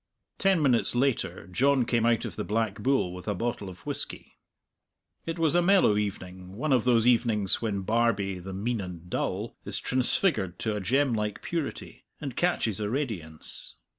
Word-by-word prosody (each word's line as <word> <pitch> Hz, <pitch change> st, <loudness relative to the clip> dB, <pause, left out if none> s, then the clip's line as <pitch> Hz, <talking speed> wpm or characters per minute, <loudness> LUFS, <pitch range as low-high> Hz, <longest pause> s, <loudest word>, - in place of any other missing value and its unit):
Ten 190 Hz, -5 st, +3 dB
minutes 125 Hz, -3 st, +3 dB
later 135 Hz, 0 st, 0 dB
John 130 Hz, +7 st, +2 dB
came 115 Hz, -1 st, +2 dB
out 115 Hz, -2 st, +2 dB
of -, -, -6 dB
the -, -, -3 dB
Black 110 Hz, -1 st, -1 dB
Bull 130 Hz, -9 st, +1 dB
with 90 Hz, +2 st, -9 dB
a 105 Hz, -, 0 dB
bottle 115 Hz, -2 st, -3 dB
of 90 Hz, -, -13 dB
whisky. -, -, -5 dB, 0.9 s
It 165 Hz, +1 st, -3 dB
was 165 Hz, -2 st, +2 dB
a 175 Hz, -, +4 dB
mellow 185 Hz, -, +4 dB
evening, 95 Hz, -3 st, -4 dB
one 140 Hz, +6 st, 0 dB
of 125 Hz, -3 st, +2 dB
those 120 Hz, -2 st, +4 dB
evenings 115 Hz, -5 st, +2 dB
when 105 Hz, -4 st, -1 dB
Barbie, 100 Hz, -3 st, +1 dB
the 95 Hz, +2 st, -8 dB
mean 105 Hz, +4 st, -2 dB
and 90 Hz, -2 st, -9 dB
dull, -, -, -2 dB
is -, -, -3 dB
transfigured 125 Hz, -, +1 dB
to 110 Hz, -2 st, -2 dB
a 105 Hz, -, -3 dB
gem 130 Hz, +6 st, +2 dB
like 105 Hz, -2 st, -2 dB
purity, 165 Hz, -4 st, -4 dB, 0.2 s
and 135 Hz, -5 st, -5 dB
catches 115 Hz, -, +1 dB
a 105 Hz, -1 st, -2 dB
radiance. 105 Hz, -, -4 dB
115 Hz, 175 wpm, -28 LUFS, 100-135 Hz, 0.9 s, a